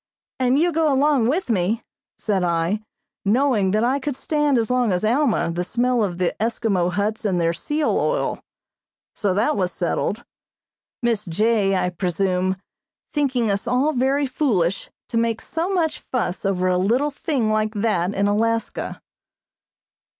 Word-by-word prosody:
"And 255 +1 +3
you 345 +4 +3
go 320 -2 +2
along 275 -3 +3
with 325 +9 0
me," 210 +3 0 0.3
said 195 -4 0
I, 170 +4 0 0.4
knowing 220 -2 +2
that 215 +3 +1
I 260 +4 +2
could 280 0 -3
stand 295 -1 +1
as 230 0 0
long 250 -4 +2
as 180 +1 0
Alma 240 - +2
the 175 +1 -2
smell 240 +4 +1
of 180 -4 -2
the 180 -1 0
Eskimo 215 -5 0
huts 210 +3 -1
and 190 -4 +1
their 165 0 +1
seal 295 - 0
oil. - - -1 0.7
So 200 -3 0
that 225 +9 +2
was 185 -3 0
settled, 190 +6 -2 0.8
Miss 230 -3 +1
J., 200 +2 +2
I 180 -1 0
presume, 185 +1 0 0.6
thinking 255 -7 +1
us 200 0 -2
all 270 +5 +2
very 270 +2 +1
foolish 210 - 0 0.2
to 230 - -1
make 230 -1 +1
so 330 +3 -3
much 320 -6 0
fuss 215 -9 -3
over 185 -2 +1
a 180 0 +2
little 245 +10 +1
thing 270 -6 -1
like 215 0 0
that 200 -3 0
in 200 - +1
Alaska. 225 +2 -1
220 Hz, 155 wpm, -22 LUFS, 190-265 Hz, 0.8 s, And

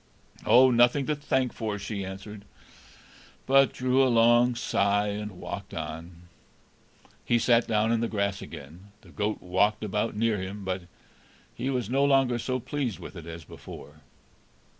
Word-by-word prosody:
"Oh, 130 +1 +7
nothing 120 +3 +4
to 150 - 0
thank 130 -3 -1
for!" 110 -3 -3
she 100 0 -5
answered, 95 +2 -8 1.0
but 135 0 +5
drew 130 +1 +1
a 130 - +3
long 120 +1 +4
sigh, 105 -3 +1
and 105 0 -5
walked 100 0 -7
on. 80 +2 -7 1.0
He 120 - +2
sat 115 0 +3
down 110 0 +1
on 115 - +2
the 115 - 0
grass 100 -2 -2
again. 85 +9 -11
The - - -18
goat 105 +1 -3
walked 100 +4 +1
about 105 +2 -2
near 110 -1 +1
him, 95 +2 -6
but 95 -1 -3 0.7
he 130 - -3
was 125 -5 -1
no 135 +4 +1
longer 135 -4 +3
so 130 +2 -2
pleased 130 -3 -3
with - - -10
it 85 -2 -9
as 85 0 -8
before. 75 0 -12
110 Hz, 160 wpm, -27 LUFS, 100-125 Hz, 1.0 s, Oh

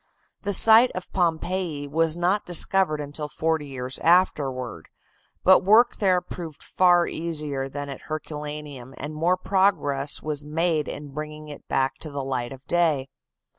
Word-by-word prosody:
The 200 - -2
site 225 +5 +7
of 185 - -7
Pompeii 170 -3 -1
was 160 +2 +1
not 180 +4 +1
discovered 175 -2 +3
until 150 +1 -5
forty 160 -1 -2
years 130 -1 -5
afterward, 135 - +1 0.5
but 190 0 +6
work 220 +5 +4
there 185 -3 +2
proved 165 -5 -9
far 175 -1 +3
easier 150 -5 -3
than 145 +1 -6
at 140 -2 -8
Herculaneum, 150 -4 -7
and 150 +2 -6
more 170 +4 +1
progress 185 -8 0
was 150 -1 -4
made 155 0 -1
in 145 0 -7
bringing 150 0 -7
it 145 - -11
back 135 0 0
to 155 - -7
the 140 -1 -5
light 130 -2 -3
of 135 0 -11
day. 155 -6 +1
155 Hz, 150 wpm, -24 LUFS, 145-175 Hz, 0.5 s, site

